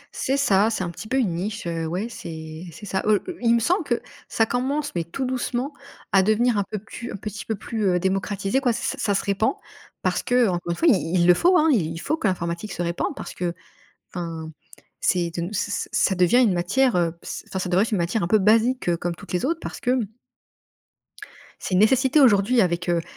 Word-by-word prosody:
C'est 270 +1 0
ça, 210 -6 +3
c'est 215 -4 -2
un 170 - -3
petit 190 +5 -9
peu 260 - 0
une 215 -10 +1
niche, 205 +4 -4
heu, 165 -1 -2
ouais, 185 +7 -2
c'est 160 -6 -8
c'est 205 - -11
ça. 190 -1 -1
Oh, 215 -1 +5
i 365 - -3
il 235 -1 +4
me - - +3
semble 360 - +1
que - - 0 0.3
ça 225 - +2
commence, 275 +5 -1
mais 170 -1 -1
tout 260 +11 -4
doucement, 255 +2 -2 0.4
à 195 - +5
devenir 215 +4 +2
un - - +1
peu 215 - -3
plus 230 +4 -8
un - - -5
petit 200 0 -6
peu 220 - -2
plus, 215 +1 -3
heu, 180 -1 +2
démocratisé, 195 +5 0
quoi. 245 -3 +2
Ç - - -3
ça 275 - -2
ça 205 -4 +1
se - - 0
répand 200 - +1 0.5
parce - - +1
que, 245 -1 +3
encore 175 -1 -3
une 170 - 0
fois, 335 - +1
i 185 - +3
il 170 - +3
le 180 - +7
faut, 360 - +4
hein. 320 0 +4
Il 165 - 0
faut 310 - -1
que 225 - -1
l'informatique 170 +2 -3
se 175 - -3
répande, 170 0 -2
parce - - -7
que, 175 -1 -3 0.6
enfin, 165 -3 -5 0.5
c'est 175 -2 +1
de 170 - -1
nous 175 +5 -4
c'est 205 0 -2
c'est - - -2
ça 195 - +2
devient 180 +6 +4
une 215 -7 +4
matière, 240 +9 +2
heu, 170 -1 0
ce - - -6
enfin, 190 - -4
ça 180 - -3
devrait 180 +2 +3
être - - -5
une 210 - 0
matière 175 +5 0
un 170 - -1
peu 215 - +5
basique, 225 +4 +3
heu, 170 - +2
comme 175 0 -3
toutes 200 - -11
les 180 +5 -1
autres, 330 +4 0
parce - - -7
que 250 +1 +1 1.6
c'est - - -4
une - - +4
nécessité 260 +6 +4
aujourd'hui, 235 -2 +5
avec, 175 -1 0
heu, 170 -1 +2
200 Hz, 240 wpm, -23 LUFS, 175-245 Hz, 1.6 s, le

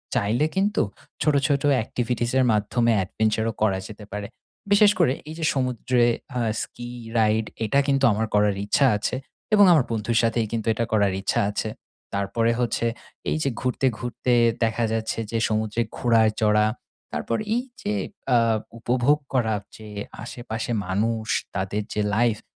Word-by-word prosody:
চাইলে 115 +9 +2
কিন্তু 200 +2 +2 0.4
ছোটো, 150 -2 +3
ছোটো 140 0 +1 0.2
activities 120 0 -2
এর 130 - +4
মাধ্যমে 115 +3 +2
adventure 110 +3 0
ও - - -12
করা 100 -3 +3
যেতে 105 -1 -10
পারে। 105 -1 -4 0.4
বিশেষ 205 0 +7
করে 155 -7 +4 0.2
এই 160 - -6
যে 160 - -1
সমুদ্রে 125 -2 +1 0.3
আ - - +1 0.2
ski 120 0 -7 0.3
ride 110 0 +2 0.2
এটা 125 +6 +2
কিন্তু 135 -1 +2
আমার 110 +2 0
করার 105 -1 +3
ইচ্ছা 135 +6 +3
আছে - - -2 0.4
এবং 205 -1 +8
আমার 150 -7 +5
বন্ধুর 115 +1 0
সাথেই 115 0 +1
কিন্তু 115 -1 -3
এটা 115 +1 -1
করার 100 -3 +3
ইচ্ছা 95 - 0
আছে। 105 +1 -2 0.4
তারপরে 100 +4 +1
হচ্ছে 120 -1 0 0.4
এই - - 0
যে 135 - +1
ঘুরতে, 130 +1 +1
ঘুরতে 125 0 -1 0.3
দেখা 115 +1 +1
যাচ্ছে 110 0 -2
যে 115 - 0
সমুদ্রে 110 +1 0 0.2
ঘোড়ায় 115 -3 +4
চড়া, 105 -1 +4 0.5
তারপর 75 +10 -2 0.2
এই 245 - 0 0.2
যে 210 - -1 0.4
আ - - +7 0.4
উপভোগ 125 +5 +2 0.2
করার 110 -5 +1 0.2
যে 110 -1 -11 0.4
আশেপাশে 120 -1 -5 0.2
মানুষ, 110 +3 -1 0.3
তাদের 100 +2 -1
যে 105 - 0
life 115 -2 +2
115 Hz, 155 wpm, -24 LUFS, 110-125 Hz, 0.5 s, এবং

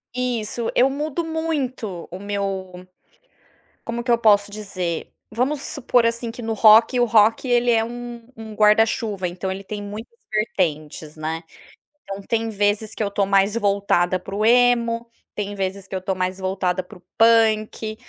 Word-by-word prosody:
Isso, 240 -2 -2
eu 260 +2 +4
mudo 300 +4 -3
muito 275 - -3
o 180 - -6
meu 195 -2 -4 1.0
como 235 +1 -4
que 240 - -3
eu 235 - +5
posso 205 -3 +3
dizer? 185 -5 -4 0.2
Vamos 260 +6 -1
supor, 245 -3 +1
assim, 230 0 -2
que 230 - -9
no 225 -1 -2
rock 220 +3 +6
o 245 - +4
rock 225 +1 +3
ele 245 0 +3
é 225 -1 +3
um 240 0 -8
um 220 -1 -9
guarda-chuva, 210 -2 +2
então, 180 +2 -5
ele 190 +1 -6
tem 205 +1 -6
muitas 215 - -9
vertentes, 160 -8 -2
né, 160 +1 -4 0.6
então 195 0 -7
tem 225 +2 -1
vezes 205 +1 0
que - - -2
eu 200 - -2
tô 200 0 +1
mais 195 +1 +3
voltada 200 -4 +1
para 195 +2 -10
o 210 - -1
emo, 235 -1 +3 0.3
tem 205 -1 -3
vezes 195 0 -4
que 190 - -6
eu 185 - -3
tô 190 +1 -2
mais 185 +1 -2
voltada 185 -1 -1
para 185 +3 -14
o - - -22 0.2
punk, 220 -1 +3
215 Hz, 170 wpm, -22 LUFS, 195-235 Hz, 1.0 s, rock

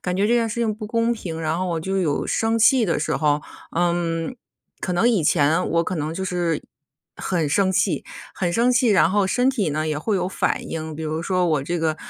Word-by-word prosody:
感 180 0 -2
觉 200 +2 +2
这 240 - +3
件 230 -1 +2
事 235 +2 -3
情 220 -2 0
不 215 -1 -7
公 230 +1 +1
平， 165 -7 -5
然 160 +1 -1
后 185 - -1
我 165 -2 -2
就 190 +3 -2
有 155 -6 0
生 225 0 +1
气 225 +2 +5
的 170 - 0
时 150 - -1
候。 150 -1 +1 0.3
嗯， 170 +3 0 0.4
可 180 - -2
能 230 +7 +3
以 210 -9 +2
前 150 0 +2
我 170 +1 +2
可 185 - -3
能 155 +1 -2
就 190 +1 -3
是 175 -4 -1 0.5
很 165 -5 -1
生 190 +5 +2
气， - - 0 0.3
很 175 -2 -1
生 240 +4 +3
气 245 0 +3
然 190 -4 +4
后 200 -1 +2
身 250 +6 +2
体 210 - -1
呢 155 +2 -1
也 150 -1 -1
会 210 +6 -1
有 180 0 -1
反 - - -1
应。 160 -1 -5
比 160 - -6
如 155 +1 -3
说 180 -1 +1
我 150 -4 +1
这 170 +4 -2
个， 160 -1 0
180 Hz, 255 characters per minute, -22 LUFS, 160-215 Hz, 0.5 s, 气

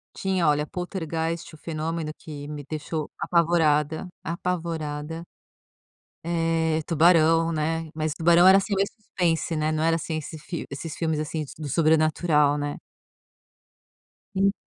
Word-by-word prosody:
Tinha, 190 -3 0
olha, 150 0 +3
Poltergeist: 165 -2 -4
O - - -11
Fenômeno, 160 0 -3
que 145 -2 -8
me 150 -1 -6
deixou 155 0 -3
apavorada, 160 -2 +2 0.2
apavorada. 165 -2 -3 1.0
Eh, 165 -1 +1
Tubarão, 165 0 +4
né, 160 +1 -1
mas 155 -1 -1
Tubarão 170 +2 +5
era, 190 +1 +9
assim, 200 +1 0
meio 195 +1 +2
suspense, 175 -7 -1
né, 155 0 0
não 155 0 -1
era 165 0 +3
assim 160 0 -3
esse 155 +1 -6
fil 165 +3 -6
esses 150 +3 -6
filmes, 160 -2 -1
assim, 155 0 -3
d - - -12
do 150 -2 -5
sobrenatural, 155 -1 +3
né. 145 0 -3 1.6
En 195 +1 +3
160 Hz, 135 wpm, -25 LUFS, 155-170 Hz, 1.6 s, era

